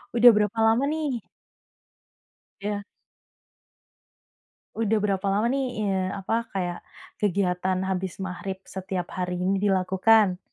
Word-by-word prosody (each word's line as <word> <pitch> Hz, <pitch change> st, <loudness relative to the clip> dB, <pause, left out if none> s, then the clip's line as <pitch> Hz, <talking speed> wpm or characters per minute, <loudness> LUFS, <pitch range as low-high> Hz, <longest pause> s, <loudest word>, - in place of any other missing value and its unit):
Udah 240 Hz, +1 st, +9 dB
berapa 210 Hz, +1 st, +1 dB
lama 225 Hz, +4 st, +3 dB
nih? 295 Hz, -8 st, -2 dB, 1.4 s
Ya. 205 Hz, 0 st, -3 dB, 1.9 s
Udah 220 Hz, -1 st, +2 dB
berapa 200 Hz, -1 st, 0 dB
lama 205 Hz, +4 st, +2 dB
nih, 255 Hz, -4 st, -1 dB
eee, 190 Hz, -2 st, 0 dB
apa 225 Hz, +4 st, -2 dB
kaya 175 Hz, -2 st, -2 dB, 0.4 s
kegiatan 185 Hz, -2 st, 0 dB
habis 190 Hz, 0 st, -3 dB
maghrib 190 Hz, +1 st, -5 dB
setiap 185 Hz, -2 st, -5 dB
hari 180 Hz, -1 st, -3 dB
ini 195 Hz, +2 st, +1 dB
dilakukan? 190 Hz, +1 st, +3 dB
195 Hz, 110 wpm, -25 LUFS, 185-220 Hz, 1.9 s, Udah